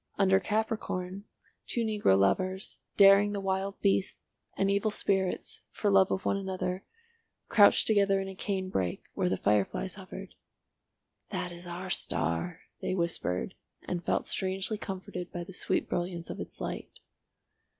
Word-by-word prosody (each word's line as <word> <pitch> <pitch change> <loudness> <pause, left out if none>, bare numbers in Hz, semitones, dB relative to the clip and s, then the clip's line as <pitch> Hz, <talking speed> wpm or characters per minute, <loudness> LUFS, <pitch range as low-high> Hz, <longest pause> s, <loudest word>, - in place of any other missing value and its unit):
Under 190 -1 +5
Capricorn, 200 -2 -2 0.4
two 235 - 0
negro 210 - +3
lovers, 185 - +1 0.2
daring 200 +1 +7
the 200 - -2
wild 195 0 -2
beasts 195 -1 -1 0.2
and 195 - +2
evil 200 +2 +2
spirits, 190 -3 -1
for 205 - 0
love 195 -1 +6
of 190 - -2
one - - +2
another, 190 -1 -3 0.7
crouched 205 -2 +6
together 200 -2 +4
in 195 - -3
a 195 - -6
cane 190 0 -2
brake 90 - -1
where - - 0
the 95 - 0
fire 105 +1 +3
flies 60 -8 -5
hovered. - - -9 1.0
"That 180 - -3
is 175 +1 -9
our 180 +2 -5
star," 85 - 0 0.2
they 185 - -1
whispered, 170 - -1 0.3
and 175 -1 -3
felt - - 0
strangely 190 +3 0
comforted 185 -3 -6
by 175 - -4
the 190 - -10
sweet - - 0
brilliance 175 -1 -3
of - - -7
its - - -7
light. - - -4
190 Hz, 150 wpm, -30 LUFS, 175-200 Hz, 1.0 s, daring